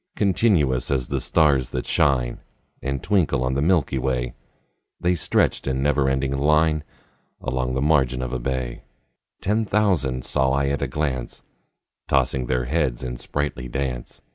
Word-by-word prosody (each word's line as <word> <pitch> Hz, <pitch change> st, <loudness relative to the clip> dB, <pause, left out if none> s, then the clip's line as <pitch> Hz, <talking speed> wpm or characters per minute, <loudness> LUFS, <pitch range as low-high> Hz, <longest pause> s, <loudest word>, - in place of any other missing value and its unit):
Continuous 90 Hz, -, +2 dB
as 65 Hz, -3 st, -1 dB
the -, -, 0 dB
stars 70 Hz, -5 st, +3 dB
that -, -, -3 dB
shine 60 Hz, -4 st, +1 dB, 0.4 s
And 70 Hz, 0 st, -3 dB
twinkle 85 Hz, -10 st, +2 dB
on 65 Hz, +1 st, 0 dB
the 70 Hz, -, 0 dB
milky 75 Hz, -5 st, +2 dB
way, 65 Hz, -1 st, -1 dB, 0.7 s
The 90 Hz, +1 st, +2 dB
stretched 80 Hz, -, +1 dB
in 65 Hz, 0 st, 0 dB
never 70 Hz, -1 st, +2 dB
ending 65 Hz, 0 st, 0 dB
line 75 Hz, +2 st, +3 dB, 0.6 s
Along 65 Hz, 0 st, -2 dB
the 65 Hz, -, 0 dB
margin 65 Hz, -4 st, +2 dB
of 65 Hz, 0 st, -4 dB
a 65 Hz, -, -1 dB
bay: 65 Hz, -1 st, -3 dB, 0.6 s
Ten 105 Hz, +3 st, +1 dB
thousand 90 Hz, -, +1 dB
saw 65 Hz, 0 st, +1 dB
I 70 Hz, 0 st, +1 dB
at 70 Hz, -, -1 dB
a 70 Hz, -, 0 dB
glance, 65 Hz, -3 st, -3 dB, 0.6 s
Tossing 65 Hz, -2 st, +1 dB
their 60 Hz, -1 st, 0 dB
heads 65 Hz, -3 st, 0 dB
in -, -, -4 dB
sprightly 65 Hz, 0 st, -3 dB
dance. 60 Hz, -1 st, -4 dB
65 Hz, 155 wpm, -23 LUFS, 65-75 Hz, 0.7 s, stars